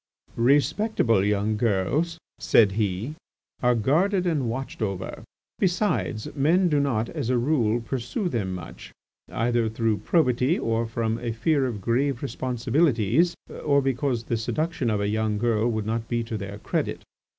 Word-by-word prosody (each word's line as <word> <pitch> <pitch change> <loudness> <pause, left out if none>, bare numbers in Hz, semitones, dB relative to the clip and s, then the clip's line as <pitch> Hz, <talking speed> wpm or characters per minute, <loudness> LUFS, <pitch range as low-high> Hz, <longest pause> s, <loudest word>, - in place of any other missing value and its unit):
"Respectable 140 - +2
young 105 +1 +1
girls," 120 - 0 0.2
said 105 -4 +4
he, 105 +5 -2 0.5
"are 125 -1 +3
guarded 175 - +2
and 150 -9 0
watched 130 +1 -5
over. 95 -3 -3 0.4
Besides, 175 - 0
men 170 +6 +3
do 150 -2 +2
not, 120 -6 0
as 115 - -3
a 130 - +2
rule, 120 -3 +1
pursue 125 - -3
them 110 - -2
much, 85 -2 -9 0.4
either 120 -1 +1
through 110 -1 0
probity, 130 -1 +2
or 115 0 -1
from 115 0 -2
a 120 -1 -3
fear 135 +4 +1
of 110 -5 -5
grave 130 +5 0
responsibilities, 130 - +1 0.3
or 140 -2 +3
because 135 -3 0
the 115 - -1
seduction 155 +3 -1
of 105 -2 0
a 100 - 0
young 110 0 0
girl 115 0 +1
would 110 -2 -2
not 115 +1 -2
be 120 0 -1
to 115 0 -5
their 100 0 -5
credit. - - -2
120 Hz, 150 wpm, -25 LUFS, 110-140 Hz, 0.5 s, said